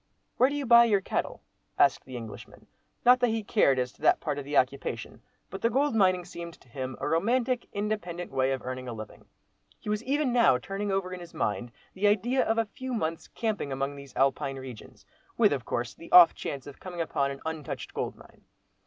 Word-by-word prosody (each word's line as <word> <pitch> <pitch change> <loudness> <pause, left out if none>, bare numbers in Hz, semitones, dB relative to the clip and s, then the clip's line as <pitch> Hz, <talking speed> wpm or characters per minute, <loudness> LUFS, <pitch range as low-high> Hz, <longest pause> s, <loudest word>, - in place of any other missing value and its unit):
"Where 255 - +5
do 285 - -3
you 290 -1 -2
buy 235 -1 +8
your 210 -4 +3
cattle?" 190 - -3 0.3
asked - - +3
the 130 -1 -7
Englishman—not 120 - -1
that 245 - +3
he 225 -1 -1
cared 195 - +3
as 125 -1 -1
to - - -25
that - - +4
part 145 -3 -2
of 140 - -7
the 145 0 -1
occupation, 135 +2 -1 0.3
but 195 - -6
the 230 - +3
gold 280 +3 +1
mining 185 -4 +3
seemed 170 -1 -8
to - - -24
him 130 +1 -5
a - - -2
romantic, 240 +8 +1
independent 200 -4 -3
way 135 0 +1
of 135 - -3
earning 130 0 -5
a 120 - -4
living. 110 -2 -10 0.5
He - - -7
was 210 +2 -1
even 275 0 0
now 235 - +5
turning 195 +9 -4
over 190 -1 -1
in 180 - -6
his 175 -1 -11
mind 120 +3 -2 0.2
the 200 +2 +1
idea 230 +6 +2
of 225 - 0
a 230 - +2
few 255 +4 -6
months 165 -6 -3
camping 215 - -3
among 135 +1 -2
these 140 -1 -12
Alpine 135 0 +1
regions, 130 -4 -10 0.3
with, 210 -7 +5
of 130 -4 -4
course, 120 0 -2
the 165 - -13
off 175 -2 +9
chance 140 -2 -5
of 145 - -11
coming 180 -2 -8
upon 140 -4 0
an 140 0 -7
untouched 160 -3 -5
gold - - -3
mine. - - -18
175 Hz, 215 wpm, -28 LUFS, 135-225 Hz, 0.5 s, off